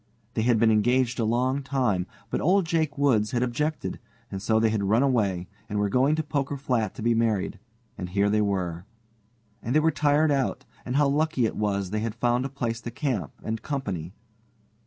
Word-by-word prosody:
They -, -, 0 dB
had 120 Hz, 0 st, +3 dB
been 110 Hz, 0 st, +4 dB
engaged 120 Hz, +3 st, +2 dB
a 115 Hz, -, +2 dB
long 125 Hz, +5 st, +1 dB
time, 125 Hz, -10 st, 0 dB, 0.2 s
but -, -, -1 dB
old 185 Hz, +3 st, +3 dB
Jake 160 Hz, -3 st, 0 dB
Woods 125 Hz, -7 st, +2 dB
had 120 Hz, 0 st, +2 dB
objected, 150 Hz, +6 st, -2 dB, 0.3 s
and 95 Hz, -, -4 dB
so 110 Hz, +2 st, +2 dB
they 110 Hz, -1 st, +3 dB
had 105 Hz, -2 st, 0 dB
run 110 Hz, +6 st, +3 dB
away, 100 Hz, -9 st, +1 dB, 0.2 s
and 105 Hz, -, -2 dB
were 105 Hz, 0 st, +1 dB
going 130 Hz, +7 st, +3 dB
to 160 Hz, -, -1 dB
Poker 145 Hz, -1 st, -2 dB
Flat 125 Hz, -7 st, -1 dB
to -, -, -7 dB
be 120 Hz, 0 st, +3 dB
married, 110 Hz, -4 st, 0 dB, 0.4 s
and 90 Hz, -2 st, -4 dB
here 100 Hz, +2 st, +2 dB
they 105 Hz, +1 st, +2 dB
were. 90 Hz, -4 st, -1 dB, 0.8 s
And 120 Hz, +5 st, -2 dB
they -, -, +7 dB
were 160 Hz, +1 st, +3 dB
tired 150 Hz, +1 st, +3 dB
out, 135 Hz, -2 st, 0 dB, 0.2 s
and 125 Hz, -, -3 dB
how 145 Hz, 0 st, +4 dB
lucky 145 Hz, -3 st, +1 dB
it -, -, -2 dB
was 100 Hz, -3 st, -1 dB
they 110 Hz, -, 0 dB
had 110 Hz, 0 st, -3 dB
found 120 Hz, +2 st, +1 dB
a -, -, -3 dB
place 120 Hz, -4 st, -3 dB
to 120 Hz, -, -5 dB
camp 120 Hz, -, -2 dB
and 110 Hz, 0 st, -3 dB
company. 100 Hz, -, -4 dB
120 Hz, 205 wpm, -26 LUFS, 105-140 Hz, 0.8 s, they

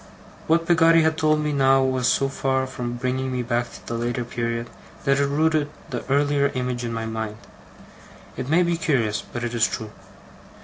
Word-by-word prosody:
What 165 Hz, +1 st, +3 dB
Peggotty 165 Hz, -1 st, +5 dB
had 160 Hz, 0 st, +2 dB
told 155 Hz, -1 st, +2 dB
me 150 Hz, -1 st, -1 dB
now, 135 Hz, -1 st, +4 dB
was 130 Hz, -2 st, +1 dB
so 135 Hz, -, +2 dB
far 135 Hz, -1 st, 0 dB
from 125 Hz, -2 st, -5 dB
bringing 130 Hz, +1 st, -2 dB
me 125 Hz, -1 st, -1 dB
back 120 Hz, 0 st, -1 dB
to -, -, -13 dB
the -, -, -5 dB
later 120 Hz, +1 st, -2 dB
period, 115 Hz, 0 st, -3 dB, 0.4 s
that 140 Hz, 0 st, +3 dB
it 140 Hz, -, +2 dB
rooted 155 Hz, +1 st, +1 dB, 0.2 s
the 120 Hz, -, -3 dB
earlier 145 Hz, 0 st, +3 dB
image 125 Hz, -1 st, -2 dB
in 120 Hz, -, -3 dB
my 115 Hz, 0 st, -3 dB
mind. 110 Hz, -1 st, -4 dB, 1.0 s
It 130 Hz, -, -5 dB
may 170 Hz, +4 st, +4 dB
be 170 Hz, -1 st, 0 dB
curious, 125 Hz, -, 0 dB
but 120 Hz, -, -7 dB
it 120 Hz, 0 st, -3 dB
is 115 Hz, -1 st, +3 dB
true. 110 Hz, -1 st, -5 dB
130 Hz, 190 wpm, -23 LUFS, 120-150 Hz, 1.0 s, Peggotty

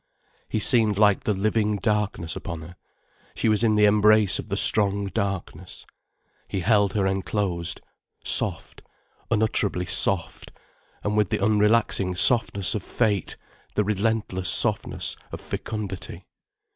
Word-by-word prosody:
He -, -, -2 dB
seemed 110 Hz, -2 st, +4 dB
like 105 Hz, +3 st, +2 dB
the 110 Hz, -, +1 dB
living 105 Hz, +1 st, 0 dB
darkness 100 Hz, -4 st, -2 dB
upon 85 Hz, -5 st, -7 dB
her, 85 Hz, +3 st, -12 dB, 0.6 s
she -, -, -1 dB
was 110 Hz, +1 st, +2 dB
in 110 Hz, -2 st, +2 dB
the 105 Hz, 0 st, +4 dB
embrace 105 Hz, -1 st, +4 dB
of -, -, -8 dB
the 100 Hz, -, -2 dB
strong 100 Hz, -1 st, +2 dB
darkness. 95 Hz, -3 st, -5 dB, 0.6 s
He 95 Hz, -, -4 dB
held 100 Hz, +1 st, +2 dB
her 100 Hz, -3 st, 0 dB
enclosed, 95 Hz, -2 st, -2 dB, 0.4 s
soft, -, -, -1 dB, 0.5 s
unutterably 105 Hz, -4 st, 0 dB
soft, 85 Hz, -2 st, +1 dB, 0.5 s
and 105 Hz, 0 st, -2 dB
with 105 Hz, -3 st, +1 dB
the -, -, -1 dB
unrelaxing 105 Hz, -2 st, +1 dB
softness 100 Hz, -4 st, +4 dB
of 105 Hz, -, -3 dB
fate, 105 Hz, -1 st, -2 dB, 0.4 s
the 105 Hz, -, +1 dB
relentless 105 Hz, -2 st, -2 dB
softness -, -, +1 dB
of -, -, -7 dB
fecundity. 105 Hz, -4 st, -7 dB
105 Hz, 130 wpm, -23 LUFS, 95-105 Hz, 0.6 s, seemed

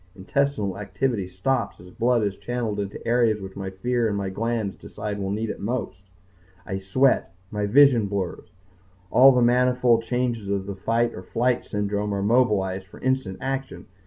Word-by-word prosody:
Intestinal 105 Hz, -1 st, -1 dB
activity 105 Hz, -2 st, -1 dB
stops 100 Hz, +6 st, -1 dB
as 90 Hz, +1 st, -13 dB
blood 120 Hz, +1 st, +1 dB
is 100 Hz, -2 st, -1 dB
channeled 110 Hz, 0 st, -3 dB
into 100 Hz, 0 st, -4 dB
the -, -, -11 dB
areas 115 Hz, -2 st, +3 dB
which 95 Hz, -1 st, -9 dB
my 95 Hz, -1 st, -4 dB
fear 120 Hz, +5 st, 0 dB
and 100 Hz, -2 st, -1 dB
my 100 Hz, -1 st, -2 dB
glands 110 Hz, -1 st, -2 dB
decide 105 Hz, -1 st, -6 dB
will 95 Hz, -1 st, -2 dB
need 110 Hz, +3 st, -2 dB
it -, -, -8 dB
most. 110 Hz, -4 st, -3 dB, 0.6 s
I 95 Hz, +1 st, -3 dB
sweat. 100 Hz, +2 st, +2 dB, 0.2 s
My 105 Hz, -1 st, -1 dB
vision 125 Hz, -2 st, +5 dB
blurs. 95 Hz, -5 st, -4 dB, 0.6 s
All 135 Hz, +2 st, +8 dB
the 125 Hz, -2 st, +3 dB
manifold 125 Hz, -1 st, +3 dB
changes 115 Hz, -3 st, -2 dB
of 100 Hz, -1 st, -1 dB
the 100 Hz, -, -4 dB
fight 115 Hz, +5 st, 0 dB
or -, -, -7 dB
flight 120 Hz, +6 st, 0 dB
syndrome 105 Hz, 0 st, -1 dB
are 100 Hz, -, -1 dB
mobilized 100 Hz, -5 st, +2 dB
for -, -, -14 dB
instant 130 Hz, -7 st, -1 dB
action. 135 Hz, 0 st, -4 dB
105 Hz, 175 wpm, -24 LUFS, 100-125 Hz, 0.6 s, All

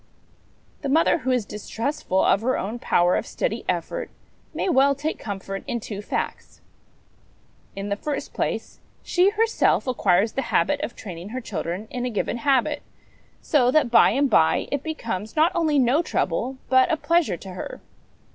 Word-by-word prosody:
The 280 Hz, -, -3 dB
mother 325 Hz, +3 st, +3 dB
who 260 Hz, -, -3 dB
is 250 Hz, -4 st, +1 dB
distrustful 210 Hz, 0 st, -2 dB
of 200 Hz, -, +3 dB
her 255 Hz, +3 st, +1 dB
own 220 Hz, +5 st, -4 dB
power 175 Hz, -5 st, +3 dB
of -, -, -2 dB
steady -, -, -2 dB
effort -, -, -2 dB, 0.4 s
may -, -, -2 dB
well 280 Hz, -4 st, +4 dB
take 300 Hz, +3 st, -3 dB
comfort 195 Hz, -1 st, -5 dB
in 240 Hz, -3 st, -2 dB
two 205 Hz, -2 st, -6 dB
facts. -, -, -4 dB, 1.2 s
In 195 Hz, +1 st, -4 dB
the 200 Hz, -, 0 dB
first 285 Hz, +6 st, -4 dB
place, -, -, -3 dB, 0.2 s
she 360 Hz, +2 st, +3 dB
herself 445 Hz, +2 st, +2 dB
acquires 210 Hz, -5 st, +2 dB
the 270 Hz, -, -2 dB
habit 290 Hz, 0 st, +2 dB
of 300 Hz, -, -4 dB
training 180 Hz, -2 st, -8 dB
her 255 Hz, +3 st, -4 dB
children 195 Hz, -3 st, -4 dB
in 250 Hz, -1 st, -3 dB
a -, -, -1 dB
given 225 Hz, +1 st, -2 dB
habit, 275 Hz, +3 st, +1 dB, 0.6 s
so 255 Hz, -5 st, +3 dB
that 265 Hz, -3 st, +3 dB
by -, -, +7 dB
and 280 Hz, +1 st, +2 dB
by 160 Hz, -10 st, +3 dB
it 285 Hz, -, -1 dB
becomes, 230 Hz, -10 st, -4 dB
not 320 Hz, +3 st, +4 dB
only 315 Hz, -3 st, +1 dB
no 265 Hz, +4 st, +4 dB
trouble, 255 Hz, -, -1 dB
but 260 Hz, 0 st, +4 dB
a 320 Hz, -, +2 dB
pleasure 330 Hz, -, +1 dB
to 195 Hz, -, -10 dB
her. 180 Hz, -, -7 dB
255 Hz, 170 wpm, -24 LUFS, 205-295 Hz, 1.2 s, by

